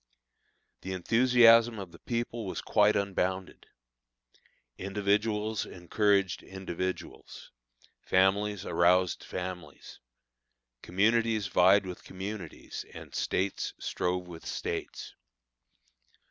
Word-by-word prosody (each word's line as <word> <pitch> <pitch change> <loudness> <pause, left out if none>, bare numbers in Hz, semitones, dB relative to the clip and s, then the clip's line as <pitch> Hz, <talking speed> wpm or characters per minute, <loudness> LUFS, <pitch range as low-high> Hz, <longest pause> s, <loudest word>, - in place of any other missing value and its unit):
The 95 - -5
enthusiasm 115 +3 +5
of 95 -4 -7
the 85 - -15
people 120 -2 -3
was - - -4
quite 105 -1 +3
unbounded. 95 -2 -2 1.1
Individuals 105 +2 0
encouraged 100 +1 0
individuals; 95 -1 -6 0.5
families 100 +2 +1
aroused 90 +1 +2
families; 90 -1 -7 0.8
communities 110 +3 +1
vied 95 +2 +5
with 90 -1 -8
communities, 95 -2 -7
and - - -10
States 95 +1 -2
strove 90 0 -2
with 85 -2 -10
States. - - -5
100 Hz, 85 wpm, -29 LUFS, 90-105 Hz, 1.1 s, enthusiasm